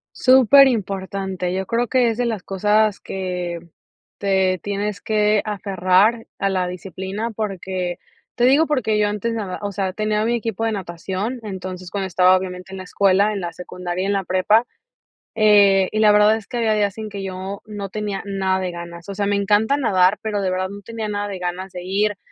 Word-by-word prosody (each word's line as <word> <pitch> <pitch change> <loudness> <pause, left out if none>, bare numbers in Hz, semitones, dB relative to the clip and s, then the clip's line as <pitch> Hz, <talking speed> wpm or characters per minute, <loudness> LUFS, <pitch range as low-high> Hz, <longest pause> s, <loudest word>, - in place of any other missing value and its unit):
Súper 265 +1 +7
importante, 190 -4 -2
yo 190 +1 -2
creo 235 +5 0
que 245 -1 +3
es 225 - -3
de 245 - 0
las 220 -5 -2
cosas, 210 +2 +1
que 180 -2 -4 0.6
te 190 -2 +1
tienes 205 0 -3
que 210 -1 +2
aferrar 200 +2 +1
a 195 - 0
la 185 -2 0
disciplina 190 +5 -5
porque, 190 -4 -3 0.4
te 240 - 0
digo, 280 +6 +5
porque 250 -7 +1
yo 210 - +3
antes, 210 +3 -2
nada 205 -5 -4
o 205 -1 -3
sea, 195 -1 -2
tenía 215 +1 0
mi 235 +1 +1
equipo 225 -1 -2
de 225 - 0
natación, 190 +5 -4
entonces 185 -3 -6
cuando 195 -2 -2
estaba, 185 +1 +4
obviamente, 185 0 -5
en - - -6
la 185 - -6
escuela, 200 +2 +2
en 205 - -3
la 175 -2 -5
secundaria, 180 +1 -5
en 200 - 0
la 195 -2 -1
prepa, 185 +6 +3 0.7
eh, 200 -3 +5
y 215 - -1
la 215 -1 +6
verdad 210 +1 +5
es 220 -2 -8
que 245 - -5
había 225 -2 +2
días 205 -1 0
en 215 -1 -5
que 200 -1 -6
yo 190 +1 -6
no 205 -2 -6
tenía 205 -1 -4
nada 190 -1 0
de 185 -1 -2
ganas, 170 0 -9
o - - -4
sea, 200 0 -1
me 205 - +1
encanta 205 +6 +2
nadar, 195 -7 +3
pero, 210 -2 -1
de 190 - 0
verdad 185 0 -1
no 200 +1 -9
tenía 220 +1 -5
nada 205 0 -2
de 200 -2 -5
ganas 180 +1 -4
de 180 -1 -7
ir, 200 +2 0
200 Hz, 200 wpm, -21 LUFS, 185-215 Hz, 0.7 s, Súper